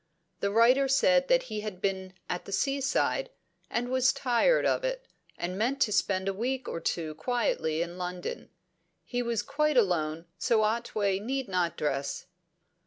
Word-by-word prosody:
The 200 Hz, -, 0 dB
writer 240 Hz, +6 st, +5 dB
said 270 Hz, 0 st, +4 dB
that 260 Hz, -1 st, +4 dB
he 215 Hz, -4 st, -5 dB
had 210 Hz, -4 st, -6 dB
been 190 Hz, -1 st, -2 dB
at 180 Hz, -, -4 dB
the -, -, -9 dB
seaside, 275 Hz, -, 0 dB, 0.4 s
and 245 Hz, +1 st, -1 dB
was 260 Hz, 0 st, +3 dB
tired 265 Hz, -, +2 dB
of -, -, +1 dB
it, -, -, -2 dB, 0.3 s
and 180 Hz, +2 st, -3 dB
meant 255 Hz, +5 st, 0 dB
to 210 Hz, -, +3 dB
spend 190 Hz, -2 st, +1 dB
a 195 Hz, -, +1 dB
week 250 Hz, +5 st, -2 dB
or -, -, -3 dB
two 160 Hz, -2 st, -2 dB
quietly 165 Hz, -6 st, 0 dB
in 175 Hz, +1 st, -8 dB
London; 180 Hz, 0 st, -5 dB, 0.6 s
he 245 Hz, -1 st, -2 dB
was 235 Hz, -2 st, -1 dB
quite 300 Hz, 0 st, +1 dB
alone, 165 Hz, -6 st, +1 dB
so 220 Hz, -2 st, +3 dB
Otway 210 Hz, -3 st, 0 dB
need 260 Hz, +4 st, -3 dB
not 180 Hz, -3 st, 0 dB
dress. 140 Hz, -1 st, -2 dB
220 Hz, 165 wpm, -29 LUFS, 185-260 Hz, 0.6 s, writer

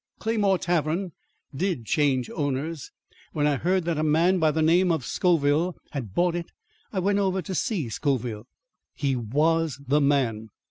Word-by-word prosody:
Claymore 210 Hz, -4 st, +1 dB
Tavern 175 Hz, +1 st, -1 dB, 0.4 s
did 170 Hz, -, -2 dB
change 135 Hz, -4 st, +1 dB
owners. 145 Hz, +2 st, -3 dB, 0.4 s
When 150 Hz, -, 0 dB
I 145 Hz, -2 st, +2 dB
heard 180 Hz, +3 st, 0 dB
that 165 Hz, -3 st, -1 dB
a -, -, +1 dB
man 165 Hz, +5 st, +3 dB
by 160 Hz, -1 st, +3 dB
the 155 Hz, +1 st, 0 dB
name 175 Hz, +3 st, +4 dB
of 155 Hz, -6 st, -1 dB
Scoville 165 Hz, 0 st, +1 dB, 0.2 s
had 120 Hz, -, -6 dB
bought 175 Hz, 0 st, +2 dB
it, 170 Hz, -1 st, -4 dB, 0.4 s
I 200 Hz, -, -6 dB
went 200 Hz, +2 st, +2 dB
over 190 Hz, -1 st, +1 dB
to 190 Hz, -, -5 dB
see 185 Hz, -, -1 dB
Scoville. 120 Hz, -2 st, -2 dB, 0.5 s
He 135 Hz, -2 st, 0 dB
was 150 Hz, +5 st, 0 dB
the 145 Hz, +3 st, +3 dB
man. 125 Hz, -6 st, +1 dB
155 Hz, 165 wpm, -25 LUFS, 140-180 Hz, 0.5 s, name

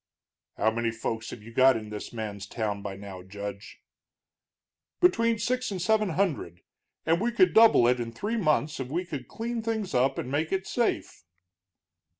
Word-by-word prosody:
"How 110 Hz, -, +2 dB
many 115 Hz, +1 st, -1 dB
folks 110 Hz, 0 st, -4 dB
have 105 Hz, -, -9 dB
you 115 Hz, +1 st, -12 dB
got 130 Hz, 0 st, +5 dB
in 110 Hz, -1 st, -8 dB
this 105 Hz, -, -6 dB
man's 105 Hz, -3 st, -5 dB
town 105 Hz, -2 st, -3 dB
by 100 Hz, -1 st, -5 dB
now, 95 Hz, -2 st, -9 dB
Judge?" 100 Hz, +2 st, -8 dB, 1.2 s
"Between 230 Hz, -10 st, +3 dB
six 255 Hz, +3 st, -1 dB
and 195 Hz, -3 st, -4 dB
seven 215 Hz, +3 st, +2 dB
hundred. 155 Hz, -, -1 dB, 0.4 s
And 165 Hz, +3 st, +2 dB
we 240 Hz, +2 st, +1 dB
could 365 Hz, +10 st, +4 dB
double 220 Hz, -, +7 dB
it 125 Hz, 0 st, +3 dB
in 115 Hz, -1 st, -3 dB
three 210 Hz, -, -3 dB
months 155 Hz, -5 st, +1 dB
if 130 Hz, -, -3 dB
we 170 Hz, +7 st, -2 dB
could 145 Hz, -7 st, -6 dB
clean 235 Hz, +1 st, -4 dB
things 220 Hz, -5 st, -2 dB
up 130 Hz, +2 st, +2 dB
and 125 Hz, -, -4 dB
make 155 Hz, +3 st, -1 dB
it 190 Hz, 0 st, -1 dB
safe." 235 Hz, -, -1 dB
135 Hz, 175 wpm, -28 LUFS, -, 1.2 s, double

